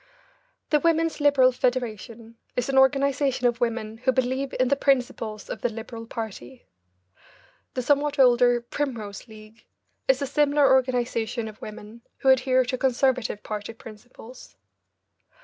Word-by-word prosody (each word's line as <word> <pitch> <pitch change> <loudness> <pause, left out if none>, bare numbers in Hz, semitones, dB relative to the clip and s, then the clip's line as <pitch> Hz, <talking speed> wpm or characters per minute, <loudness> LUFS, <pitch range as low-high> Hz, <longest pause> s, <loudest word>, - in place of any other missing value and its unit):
The 300 - +4
Women's 330 -1 +1
Liberal 275 -3 +5
Federation 230 -2 -3 0.2
is 250 +1 -2
an 270 - 0
organisation 270 -1 +2
of 240 -1 +1
women 225 -2 -2
who 255 +2 +2
believe 260 +1 -1
in 255 -1 +2
the 280 - +3
principles 245 -6 -1
of - - -6
the 245 - 0
Liberal 225 +1 -8
party. 230 +3 -8 1.1
(The 255 - -2
somewhat 290 +2 +1
older 245 -2 +4
Primrose 235 -5 -5
League 215 0 -15 0.4
is 265 -1 +3
a 280 - -1
similar 285 0 +3
organisation 245 -3 0
of 215 0 -11
women 215 +2 -10 0.2
who 265 - +1
adhere 260 0 +4
to 250 +1 -3
Conservative 255 -4 0
party 210 +1 -5
principles.) 225 +2 -14
250 Hz, 135 wpm, -25 LUFS, 225-270 Hz, 1.1 s, Liberal